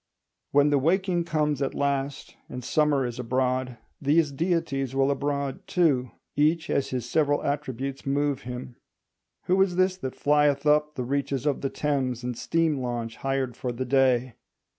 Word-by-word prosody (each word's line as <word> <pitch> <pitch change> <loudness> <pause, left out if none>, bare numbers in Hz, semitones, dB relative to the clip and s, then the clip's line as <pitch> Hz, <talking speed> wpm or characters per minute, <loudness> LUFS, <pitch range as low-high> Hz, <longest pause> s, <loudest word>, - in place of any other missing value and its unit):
When 145 +1 +4
the 145 - +4
waking 175 +3 +1
comes 150 -4 0
at 135 - -1
last, 140 0 -2
and 125 0 -6
Summer 145 0 +2
is 120 0 -5
abroad, 125 0 -1 0.2
these 150 +1 +3
deities 140 -4 -1
will 135 +1 +3
abroad 140 -1 -2
too, 145 -9 +2 0.3
each 155 +2 +2
as 140 - 0
his 125 -2 -3
several 145 -2 +1
attributes 135 -1 -3
move 140 0 0
him. 125 0 -7 0.7
Who 185 +2 +2
is 190 -2 +2
this 185 0 +2
that 130 -8 -5
flieth 145 -1 +2
up 150 0 +3
the 130 - -2
reaches 140 0 -1
of 145 -3 0
the 135 - -1
Thames 130 -5 -1
in 125 0 -2
steam 160 +4 0
launch 120 -2 -4
hired 135 -2 -2
for 125 - -3
the 125 +2 -4
day? 130 -2 +2
140 Hz, 160 wpm, -26 LUFS, 130-150 Hz, 0.7 s, When